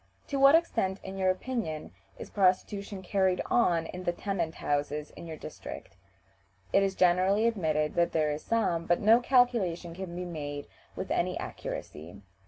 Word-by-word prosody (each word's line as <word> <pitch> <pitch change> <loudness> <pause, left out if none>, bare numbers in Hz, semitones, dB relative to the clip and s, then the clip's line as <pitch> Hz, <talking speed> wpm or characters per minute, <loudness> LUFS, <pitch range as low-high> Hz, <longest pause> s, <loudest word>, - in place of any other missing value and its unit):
"To 280 - -1
what 275 +3 +8
extent, 225 - +1
in 190 0 -7
your 190 -1 +3
opinion, 185 -5 -3 0.3
is - - -9
prostitution 195 0 0
carried 185 -1 +1
on 170 -9 +3
in 180 +2 -7
the 175 - +1
tenant 175 -3 -3
houses 145 +1 -2
in 170 - -10
your 160 -1 -6
district?" - - -9 0.8
It - - +5
is 195 -1 0
generally 185 +4 +3
admitted 155 -9 +1
that 170 0 +2
there 155 -2 +1
is 150 +1 -4
some, 175 -8 0
but 175 - +3
no 225 +3 +6
calculation 235 -10 +2
can 180 -1 -7
be 180 0 -4
made 145 -4 -5 0.3
with - - -5
any - - 0
accuracy. 85 +6 -7
180 Hz, 165 wpm, -29 LUFS, 160-200 Hz, 0.8 s, what